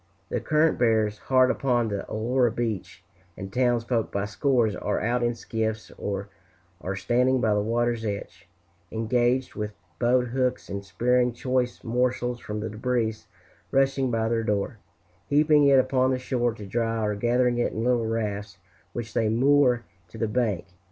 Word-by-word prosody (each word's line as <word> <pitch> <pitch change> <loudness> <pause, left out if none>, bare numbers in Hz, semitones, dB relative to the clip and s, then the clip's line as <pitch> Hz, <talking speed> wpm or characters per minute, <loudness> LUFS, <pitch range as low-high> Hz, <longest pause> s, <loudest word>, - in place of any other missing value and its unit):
The - - -1
current 155 +1 +2
bears 110 -3 +2
hard 130 -1 +3
upon 120 -4 +1
the 100 -1 -3
Aurora 120 +2 +1
beach, 110 -6 -4 0.3
and 95 0 -7
townsfolk 120 -2 +1
by 100 0 -1
scores 115 -1 +1
are 105 - -1
out 120 +3 0
in 120 0 +1
skiffs 110 -1 -3
or 100 0 -4 0.6
are 95 +1 -2
standing 125 +7 +2
by 110 -3 +2
the 105 - +2
water's 115 +1 0
edge, 100 -2 -5 0.4
engaged 120 +3 +1
with 105 -1 -4 0.3
boat 125 +1 +2
hooks 125 0 -1
in 100 0 -3
spearing 120 +6 +1
choice 125 0 -1
morsels 125 0 0
from 105 -2 -5
the 110 - -3
debris 115 0 0 0.6
rushing 135 -1 +2
by 115 -1 0
their 115 0 +1
door 105 +1 -1 0.5
heaping 150 0 +4
it 140 -1 +6
upon 130 0 +3
the 130 - +1
shore 120 -2 -1
to 105 - -9
dry, 115 +2 -1
or 105 - 0
gathering 120 +3 +1
it 120 - +1
in 110 - -3
little 120 -2 +2
rafts 105 -3 -3 0.4
which 115 -2 -5
they 110 -2 +1
moor 125 +1 +3 0.2
to 90 - -12
the 115 - 0
bank. 105 -6 0
120 Hz, 165 wpm, -26 LUFS, 110-125 Hz, 0.6 s, it